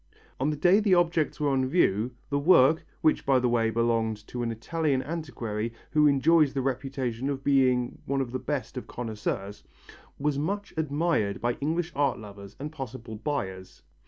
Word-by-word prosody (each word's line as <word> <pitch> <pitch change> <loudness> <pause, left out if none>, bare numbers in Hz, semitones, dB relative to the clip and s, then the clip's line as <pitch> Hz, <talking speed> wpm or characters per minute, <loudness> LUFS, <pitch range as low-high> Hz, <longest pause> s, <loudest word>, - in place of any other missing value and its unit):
On 135 +3 +1
the 155 - -1
day 175 +7 +4
the 205 -4 +4
objects 170 -3 +1
were 150 -1 +1
on 130 -1 +1
view, 120 - +2 0.2
the 140 - +2
work 155 -1 +5 0.2
which 155 - +2
by 135 -1 +3
the 125 0 +2
way 115 -1 +2
belonged 115 -2 0
to 120 - -4
an 115 -1 -1
Italian 135 +4 -1
antiquary 115 -8 -4 0.2
who 150 -1 +5
enjoys 145 +1 +4
the 135 - +1
reputation 135 -1 -2
of 135 -1 -3
being 130 -3 +2
one 140 0 0
of 130 -3 -2
the 130 - -2
best 130 -1 -4
of 125 - -6
connoisseurs 105 -3 -4 0.5
was 145 0 0
much 200 +7 -3
admired 150 -8 0
by 120 0 0
English 165 +4 -1
art 140 -3 +1
lovers 100 -2 -11
and 150 +2 -5
possible 130 -6 -7
buyers. 100 -7 -4
135 Hz, 175 wpm, -27 LUFS, 115-150 Hz, 0.5 s, work